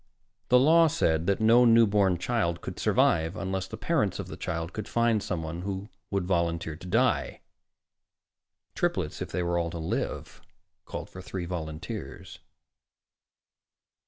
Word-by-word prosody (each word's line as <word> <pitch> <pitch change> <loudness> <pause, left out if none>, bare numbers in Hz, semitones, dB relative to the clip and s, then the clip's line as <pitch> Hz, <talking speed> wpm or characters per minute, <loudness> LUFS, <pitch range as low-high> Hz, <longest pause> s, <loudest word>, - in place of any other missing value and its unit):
The 125 - +7
law 165 +5 +6
said 85 - +1
that 100 - +2
no 115 +3 +6
newborn 105 -6 +4
child 85 -4 -1
could - - -7
survive 80 +4 +2
unless 95 -1 -3
the 110 - -7
parents 115 - 0
of - - -6
the - - -6
child 85 -1 -4
could 110 - -5
find 115 -2 +2
someone 85 -2 -4
who 100 +2 -5 0.2
would 100 -2 -1
volunteer 85 -3 -1
to 90 +3 -11
die. - - +1 1.3
Triplets, - - -1
if - - -4
they 90 - -2
were 85 0 0
all 85 -1 -1
to 85 - -6
live, 80 0 -4 0.4
called - - -7
for 95 - -9
three 90 -1 -5
volunteers. 80 - -6
95 Hz, 145 wpm, -28 LUFS, 85-110 Hz, 1.3 s, The